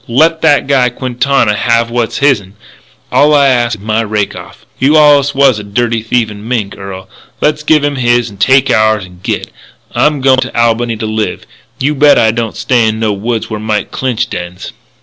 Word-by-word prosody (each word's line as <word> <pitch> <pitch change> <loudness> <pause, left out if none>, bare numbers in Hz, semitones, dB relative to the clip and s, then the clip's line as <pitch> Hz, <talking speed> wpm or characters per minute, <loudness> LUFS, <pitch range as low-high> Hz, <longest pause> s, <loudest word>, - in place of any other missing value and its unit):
Let 160 +7 +2
that 145 -4 +3
guy, 135 -3 +2
Quintana, 125 -1 0
have 115 +2 0
what's 120 -1 -2
his'n. 105 -9 0 0.6
All 150 +1 +4
I 140 -1 +4
ask 120 -3 0
is 100 - -15
my 110 +1 0
rake 105 -2 -2
off. - - -12
You 145 +4 +3
allus 145 -2 +4
was 135 -5 +3
a - - -7
dirty, 115 +3 -1
thieving 110 -2 -2
mink, 110 -5 -2
Earl. 95 -1 -9 0.3
Let's 150 0 0
give 150 -1 +2
him 145 -1 -1
his 120 -1 +1
and 100 -3 -12
take 135 +3 +3
ours 110 -3 +2
and 90 -1 -17
git. - - -4 0.4
I'm 150 -2 +1
going 130 0 +3
to 125 - -3
Albany 115 0 +1
to 110 - -4
live. 110 0 -3 0.3
You 145 +3 0
bet 145 0 +4
I 110 - +3
don't 115 -1 -4
stay 120 -1 +1
in 110 0 -2
no 110 -2 0
woods 110 +3 -3
where 110 - -3
Mike 110 -1 -2
Clinch 130 -4 -2
dens." 90 +1 -7
120 Hz, 195 wpm, -12 LUFS, 110-135 Hz, 0.6 s, All